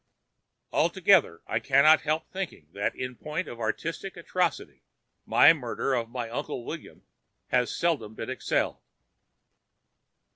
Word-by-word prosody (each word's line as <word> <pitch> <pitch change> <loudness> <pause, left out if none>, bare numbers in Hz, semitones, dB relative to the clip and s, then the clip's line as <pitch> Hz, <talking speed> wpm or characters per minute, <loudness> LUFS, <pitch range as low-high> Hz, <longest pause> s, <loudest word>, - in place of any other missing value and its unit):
"Altogether, - - +3
I - - -1
cannot 145 +4 +5
help 155 +1 -1
thinking 185 - -6
that 100 +1 -2
in 125 0 -5
point 155 +7 -4
of 120 - -8
artistic 165 - -3
atrocity 170 -1 -2 0.5
my 155 - +7
murder 135 -2 -2
of 120 -1 -2
Uncle 120 +1 -4
William - - -8 0.5
has 125 -1 +2
seldom 135 -11 -1
been - - -6
excelled." - - -1
140 Hz, 115 wpm, -27 LUFS, 120-165 Hz, 0.5 s, my